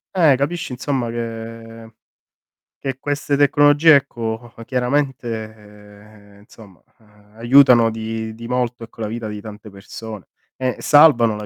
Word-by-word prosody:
Eh, 160 -6 +5
capisci 165 +1 -3
insomma 125 -2 -3
che 115 -1 -8 0.9
che 135 -1 -4
queste 145 0 -2
tecnologie 145 +2 +5
ecco, 120 -3 -3
chiaramente, 110 -6 -5
insomma 105 -3 -18 0.5
aiutano 120 -1 +5
di 110 0 -5
di 115 0 -9
molto 125 -1 -2
ecco 115 0 -12
la 110 - -2
vita 115 0 -5
di 105 -1 -7
tante 105 0 -11
persone. 105 +1 -10 0.3
E 130 -1 -2
salvano 140 -8 +5
la 105 0 -7
115 Hz, 120 wpm, -19 LUFS, 110-135 Hz, 0.9 s, Eh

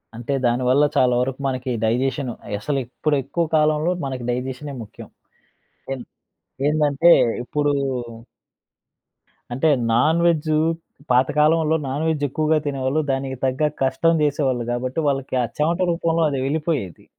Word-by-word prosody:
అంటే, 120 +4 -4
దానివల్ల 125 +3 +3
చాలా 125 -1 +4
వరకు 130 +1 -3
మనకి 130 -1 -3
డైజెషను, 125 +3 0 0.2
అసలు 135 +7 -2
ఇప్పుడెక్కువ 145 +5 -1
కాలంలో 155 +2 +2
మనకి 130 -2 -4
డైజెషనే 130 +3 -4
ముఖ్యం. 105 - -12 0.8
ఎన్ 130 -3 -5 0.6
ఏందంటే 150 +1 +3 0.3
ఇప్పుడూ 145 +3 0 1.8
అంటే, 135 +6 +1 0.2
నాన్‌వెజ్జూ 155 +5 +2 0.5
పాతకాలంలో 150 +5 +3
నాన్‌వెజ్జెక్కువగా 155 +1 0
తినేవాళ్ళు, 135 +2 0
దానికి 135 0 -2
తగ్గ 135 +4 +1
కష్టం 135 +5 +2
జేసేవాళ్ళు 135 -5 0
గాబట్టి, 130 +5 -2
వాళ్ళకి 135 -2 -2
ఆ - - 0
చెవట 165 +4 +1
రూపంలో 165 -1 0
అదెళ్ళిపోయేది. 140 - -2
140 Hz, 105 wpm, -22 LUFS, 130-155 Hz, 1.8 s, చాలా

